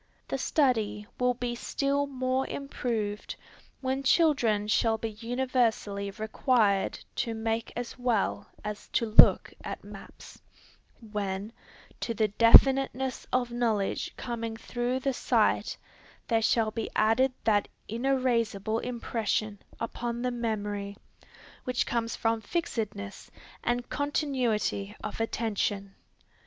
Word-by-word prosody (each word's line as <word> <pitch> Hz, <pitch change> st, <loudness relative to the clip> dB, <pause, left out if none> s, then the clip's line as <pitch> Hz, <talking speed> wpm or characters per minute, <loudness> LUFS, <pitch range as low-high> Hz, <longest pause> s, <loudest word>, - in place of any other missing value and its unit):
The -, -, -2 dB
study 225 Hz, -8 st, +1 dB
will 250 Hz, 0 st, +2 dB
be 245 Hz, 0 st, -2 dB
still 280 Hz, +3 st, 0 dB
more 260 Hz, -1 st, -1 dB
improved, 225 Hz, -7 st, -3 dB, 0.5 s
when 265 Hz, 0 st, -1 dB
children 260 Hz, -8 st, +3 dB
shall 220 Hz, +1 st, +2 dB
be 225 Hz, 0 st, -4 dB
universally 230 Hz, -3 st, 0 dB
required 215 Hz, -1 st, +1 dB, 0.2 s
to 230 Hz, -1 st, -1 dB
make 225 Hz, 0 st, -2 dB
as 245 Hz, +1 st, -5 dB
well 240 Hz, -5 st, 0 dB, 0.2 s
as 210 Hz, -1 st, -5 dB
to 230 Hz, -, +2 dB
look 215 Hz, -1 st, +6 dB
at -, -, -6 dB
maps, -, -, -12 dB, 0.7 s
when, 200 Hz, +1 st, -3 dB, 0.5 s
to 230 Hz, -, -2 dB
the 215 Hz, 0 st, +2 dB
definiteness 265 Hz, +4 st, +5 dB
of 245 Hz, -1 st, +1 dB
knowledge 225 Hz, -5 st, 0 dB
coming 230 Hz, -2 st, -4 dB
through 245 Hz, +2 st, -2 dB
the 270 Hz, +1 st, 0 dB
sight, -, -, +1 dB, 0.5 s
there 225 Hz, -2 st, +3 dB
shall 220 Hz, 0 st, +2 dB
be 225 Hz, 0 st, -3 dB
added 225 Hz, +5 st, +4 dB
that 205 Hz, -2 st, +3 dB, 0.2 s
inerasible 230 Hz, -3 st, 0 dB
impression 220 Hz, -4 st, -2 dB, 0.2 s
upon 235 Hz, +1 st, -3 dB
the 250 Hz, -, 0 dB
memory, 205 Hz, -4 st, -3 dB, 0.7 s
which 250 Hz, -1 st, 0 dB
comes 230 Hz, -1 st, -1 dB
from 225 Hz, 0 st, 0 dB
fixedness 210 Hz, -, -4 dB, 0.3 s
and 240 Hz, 0 st, 0 dB
continuity 250 Hz, -8 st, -1 dB
of 215 Hz, -, -5 dB
attention. 205 Hz, -3 st, -1 dB
230 Hz, 115 wpm, -29 LUFS, 215-250 Hz, 0.7 s, look